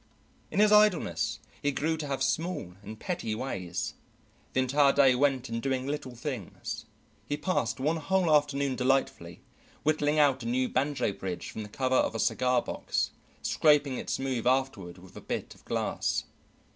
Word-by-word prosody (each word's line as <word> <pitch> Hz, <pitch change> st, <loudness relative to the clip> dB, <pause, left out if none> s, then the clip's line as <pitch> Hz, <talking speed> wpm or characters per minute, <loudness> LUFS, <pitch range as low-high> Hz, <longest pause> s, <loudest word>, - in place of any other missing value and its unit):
In -, -, -2 dB
his 210 Hz, 0 st, +6 dB
idleness 210 Hz, -5 st, +3 dB, 0.2 s
he 145 Hz, -, +1 dB
grew 160 Hz, +4 st, 0 dB
to 155 Hz, -2 st, -4 dB
have 135 Hz, -1 st, -1 dB
small 160 Hz, -, -1 dB
and 110 Hz, +1 st, -9 dB
petty 170 Hz, -, -3 dB
ways. 95 Hz, -8 st, -3 dB, 0.6 s
The -, -, +2 dB
entire 140 Hz, +2 st, +4 dB
day 135 Hz, -2 st, +5 dB
went 135 Hz, -1 st, +1 dB
in 115 Hz, 0 st, -3 dB
doing 130 Hz, 0 st, -1 dB
little 140 Hz, -3 st, -4 dB
things. 120 Hz, -, -5 dB, 0.4 s
He 145 Hz, -, 0 dB
passed 130 Hz, -8 st, -1 dB
one 155 Hz, +5 st, +1 dB
whole 175 Hz, +1 st, +2 dB
afternoon 140 Hz, -2 st, +1 dB
delightfully, 125 Hz, -10 st, 0 dB, 0.4 s
whittling 150 Hz, 0 st, +2 dB
out 140 Hz, -3 st, +4 dB
a 115 Hz, -, -5 dB
new 125 Hz, +2 st, +1 dB
banjo 130 Hz, -5 st, 0 dB
bridge 95 Hz, -2 st, -5 dB
from 110 Hz, -, -6 dB
the 105 Hz, -, -7 dB
cover 130 Hz, +3 st, +1 dB
of -, -, +1 dB
a -, -, -2 dB
cigar 125 Hz, +1 st, +2 dB
box, -, -, -2 dB, 0.3 s
scraping 145 Hz, -4 st, +3 dB
it -, -, -6 dB
smooth 130 Hz, -3 st, -1 dB
afterward 130 Hz, -9 st, 0 dB
with 95 Hz, 0 st, -15 dB
a -, -, -8 dB
bit -, -, -4 dB
of -, -, -21 dB
glass. -, -, -1 dB
135 Hz, 170 wpm, -29 LUFS, 120-145 Hz, 0.6 s, his